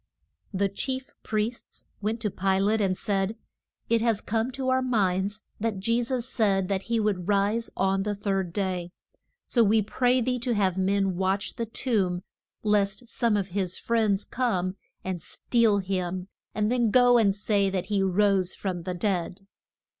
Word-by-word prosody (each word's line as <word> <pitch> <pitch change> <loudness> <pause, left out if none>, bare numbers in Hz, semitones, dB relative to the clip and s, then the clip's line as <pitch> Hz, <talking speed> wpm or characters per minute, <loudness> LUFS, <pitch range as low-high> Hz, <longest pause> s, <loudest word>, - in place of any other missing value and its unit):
The 200 0 +1
chief 260 +6 -3
priests 220 +1 -3 0.2
went 220 +2 -2
to 210 -3 -1
Pi 190 +1 +1
late 210 +3 +2
and 185 -2 +1
said, 200 +2 -1 0.5
It 230 -1 +2
has 230 -3 +2
come 225 +4 -1
to 265 -1 -2
our 260 0 +3
minds 205 -4 0 0.2
that 220 -1 -1
Je 230 +5 +1
sus 245 0 -2
said 195 -6 +1
that 195 -2 0
he 230 -1 +2
would 200 -5 -1
rise 205 +3 +1
on 195 0 +2
the 205 +1 -1
third 195 -3 -1
day, 185 -2 -2 0.6
so 235 - +3
we 215 +1 +3
pray 250 +4 +2
thee 250 +1 0
to 240 0 -1
have 190 -3 +2
men 190 -1 +1
watch 190 +2 0
the 230 - -3
tomb 195 -7 0 0.4
lest 210 +2 +1
some 230 -3 +1
of 195 -1 -2
his 185 -1 -2
friends 215 -4 +1
come 190 -7 -1 0.3
and 185 -2 -3
steal 230 +1 +1
him, 185 -1 -2 0.3
and 210 +1 +1
then 240 -2 +2
go 245 +1 +6
and 200 -3 +3
say 205 -1 +1
that 185 -1 -2
he 200 0 0
rose 190 -1 +2
from 185 -3 -3
the 180 +1 -4
dead. 180 0 -1
205 Hz, 170 wpm, -27 LUFS, 190-230 Hz, 0.6 s, go